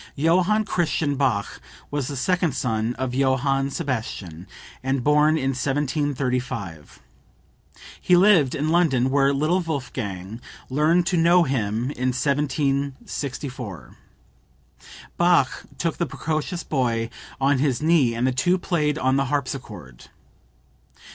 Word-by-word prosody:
Johann 180 +8 +2
Christian 155 -6 0
Bach 125 -8 -1 0.3
was 145 -3 -2
the 140 - -4
second 175 +1 0
son 115 -1 -1
of 130 -1 -3
Johann 135 +1 +1
Sebastian, 110 - -4 0.4
and 135 -1 -1
born 150 +2 +4
in 135 -2 0
1735. 130 - -2 1.0
He 180 - +4
lived 180 -8 +5
in 150 +2 -1
London 140 -7 +2
where 140 0 +3
little 155 +6 +1
Wolfgang 115 - -5 0.3
learned 160 +5 +3
to 175 0 0
know 170 +2 +5
him 120 -2 -1
in 130 -2 -1
1764. 140 - -2 1.2
Bach 175 -6 +2
took 165 -2 -2
the 170 - -1
precocious 160 +4 -3
boy 120 -5 0 0.3
on 135 0 +2
his 135 -3 +1
knee 155 -8 +3
and 120 +2 0
the 130 - +2
two 175 +9 +2
played 155 -5 0
on 130 -2 +1
the 135 - +1
harpsichord. 125 - -5
140 Hz, 120 wpm, -23 LUFS, 125-155 Hz, 1.2 s, lived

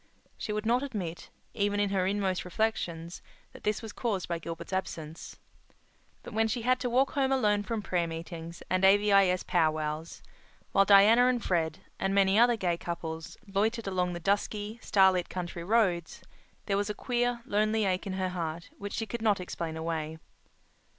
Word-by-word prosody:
She - - -5
would 210 +1 -2
not 240 +3 +3
admit, 195 -12 -5 0.2
even 205 -1 0
in 205 -1 +1
her 185 -2 +1
inmost 195 -2 0
reflections, 175 -4 -2 0.3
that - - -14
this 210 +2 -1
was 220 -2 -7
caused 205 -7 -2
by 170 -1 -2
Gilbert's 165 +2 -7
absence. 165 -4 -5 0.9
But - - -9
when 225 +1 +2
she 225 +1 -2
had 255 +2 +3
to 250 - -1
walk 260 +3 +2
home 270 -1 +1
alone 210 -6 +2
from 215 +1 -3
prayer 175 -3 0
meetings 165 0 -7
and 185 0 0
A.V.I.S. 195 -2 +5
pow 170 -4 +2
wows, 155 +1 -4 0.5
while 195 - +4
Diana 210 +5 +7
and 250 -2 +1
Fred, 165 0 0 0.2
and 195 0 0
many 195 +1 +4
other 240 0 +5
gay 175 -4 0
couples, 165 -2 -6
loitered 215 +4 0
along 180 -2 0
the 175 - -5
dusky, 205 +4 -1
starlit 190 -3 +3
country 175 -2 -5
roads, 185 -4 +1 0.4
there 200 -1 +1
was 205 +1 -1
a 210 - -3
queer, 245 -1 -1
lonely 215 -1 +1
ache 185 +1 -1
in 190 - -3
her 185 -1 -1
heart 170 -2 -5
which 205 0 -6
she 225 - -2
could 230 +2 -5
not 210 -3 +2
explain 170 -3 -5
away. 160 -1 -3
195 Hz, 175 wpm, -29 LUFS, 170-215 Hz, 0.9 s, Diana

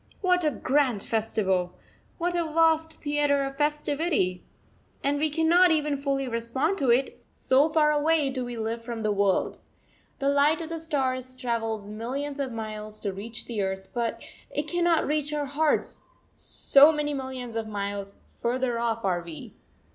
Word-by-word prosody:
What 360 -2 +3
a 305 - +3
grand 260 -5 +1
festival, 195 -5 0 0.4
what 350 0 -1
a 345 -1 +1
vast 320 0 +3
theatre 290 -1 +2
of 275 0 -4
festivity! 295 - 0 0.6
And 285 +1 +1
we 310 +1 +2
cannot 330 +4 +4
even 300 -2 +2
fully 275 -1 -1
respond 240 +10 -1
to 265 - +1
it, 250 +3 +1
so 275 +4 +3
far 305 -1 +3
away 300 -1 +2
do 260 -1 -2
we 245 -1 -6
live 225 +1 -3
from 230 -1 -5
the 215 - +1
world! 200 -2 +1 0.6
The 275 - -1
light 285 +3 +3
of 330 -1 -6
the 330 0 -4
stars 260 -5 -2
travels 225 -4 -3
millions 275 +6 -4
of 270 -2 -2
miles 215 -1 -5
to 200 -2 -2
reach 220 +4 -6
the 225 -4 -3
earth, 190 0 -3
but 235 -2 -2 0.3
it 295 - -2
cannot 345 -1 +2
reach 300 0 -1
our 295 -1 -1
hearts 295 +2 0 0.3
so 285 +3 +5
many 300 -1 -1
millions 260 -3 -5
of 225 -1 -2
miles 200 -1 -4
further 245 0 -2
off 230 -2 -1
are 180 -2 +1
we! 170 -2 -9
265 Hz, 165 wpm, -27 LUFS, 225-300 Hz, 0.6 s, so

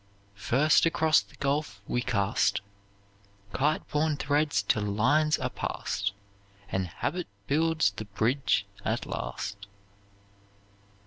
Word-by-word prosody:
First 135 +11 +3
across 160 -1 +4
the - - -18
gulf 140 -7 -1
we 125 - 0
cast 100 -4 +1 0.9
Kite 150 +8 +1
borne 150 0 +1
threads 145 -7 +1
till 105 +2 +1
lines 125 +10 +2
are - - -3
passed, 100 0 -2 0.6
And 95 -1 0
habit 170 - -3 0.2
builds 160 -4 +2
the 110 +2 -7
bridge 110 +7 +1 0.2
at - - -1
last. 100 0 -5
135 Hz, 110 wpm, -28 LUFS, 100-155 Hz, 0.9 s, across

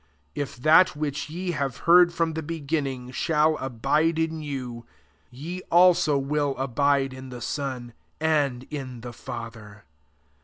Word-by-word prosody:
If 145 - -4
that 155 +8 +5
which 150 -1 -3
ye 175 +3 -3
have 140 -6 -2
heard 175 +1 +7
from 165 -1 -1
the 160 - -3
beginning 145 -5 -3
shall 155 +3 +2
abide 150 +6 0
in 160 -1 -1
you, 130 -5 -5 0.5
ye 160 +9 -7
also 175 -4 +5
will 140 0 -1
abide 135 +1 +1
in 130 0 -9
the 125 - -8
Son, 125 -3 -4 0.3
and 145 -5 +1
in 130 -5 -6
the 120 0 -8
Father. 110 -4 -9
145 Hz, 140 wpm, -25 LUFS, 125-160 Hz, 0.5 s, heard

